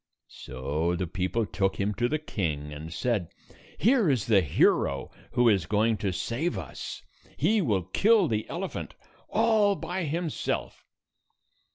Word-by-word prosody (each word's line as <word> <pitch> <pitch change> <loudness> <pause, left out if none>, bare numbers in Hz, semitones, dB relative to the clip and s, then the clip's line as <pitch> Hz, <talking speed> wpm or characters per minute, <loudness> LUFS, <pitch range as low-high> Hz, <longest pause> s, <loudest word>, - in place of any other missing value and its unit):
So 75 +6 -2
the 90 +1 -2
people 95 +6 -1
took 95 -1 0
him 105 +1 -1
to 120 +4 0
the 155 - +1
king, 75 - -3
and 75 +2 -8
said, 105 -2 -1 0.2
" - - -24
Here 230 - +4
is 130 -7 +1
the 105 -4 +5
hero 70 -3 +2 0.2
who 120 0 +4
is 95 -7 +3
going 110 +2 +2
to 100 -1 -1
save 115 - -2
us. 80 -8 -7 0.3
He 205 +9 +3
will 105 - +1
kill 200 - +3
the 110 -4 -2
elephant - - -5 0.3
all 215 -2 +3
by 175 +1 -3
himself." 165 +1 -3
110 Hz, 150 wpm, -27 LUFS, -, 0.3 s, the